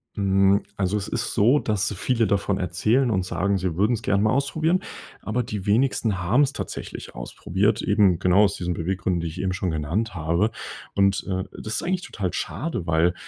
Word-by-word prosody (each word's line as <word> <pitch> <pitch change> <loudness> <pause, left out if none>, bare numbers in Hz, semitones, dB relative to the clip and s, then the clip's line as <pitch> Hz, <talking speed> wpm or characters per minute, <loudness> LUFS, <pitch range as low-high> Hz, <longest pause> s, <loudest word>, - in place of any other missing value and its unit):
Hm, 100 0 +3
also, 100 +1 0
es 100 - -4
ist - - -2
so, 125 +8 +4
dass 105 -1 -1
viele 115 +4 +1
davon 100 -1 0
erzählen 110 +8 +1
und 95 -3 0
sagen, 100 +2 0
sie 90 -3 -2
würden 105 +7 +2
es 115 - -2
gerne 100 -2 +1
mal 110 - +3
ausprobieren. 155 +6 +1 0.4
Aber 120 +4 -1
die 105 -4 -5
wenigsten 110 -3 +2
haben 100 +10 +2
es 140 -1 +2
tatsächlich - - -6
ausprobiert. 100 - -1
Eben 95 -6 +3
genau 95 +4 +4
aus 100 - -1
diesen 90 0 -2
Beweggründen, 90 +1 -1
die 85 - -3
ich 80 +3 -5
eben 95 -1 -1
schon 95 -1 -2
genannt 85 +9 -2
habe. 85 +6 +1 0.5
Und, 100 -1 +2
äh, 95 -1 -1 0.2
das 110 0 -3
ist - - -1
eigentlich 185 +1 -1
total 95 - -4
schade, 120 - -3
weil, 80 +2 +3
100 Hz, 195 wpm, -24 LUFS, 90-110 Hz, 0.5 s, so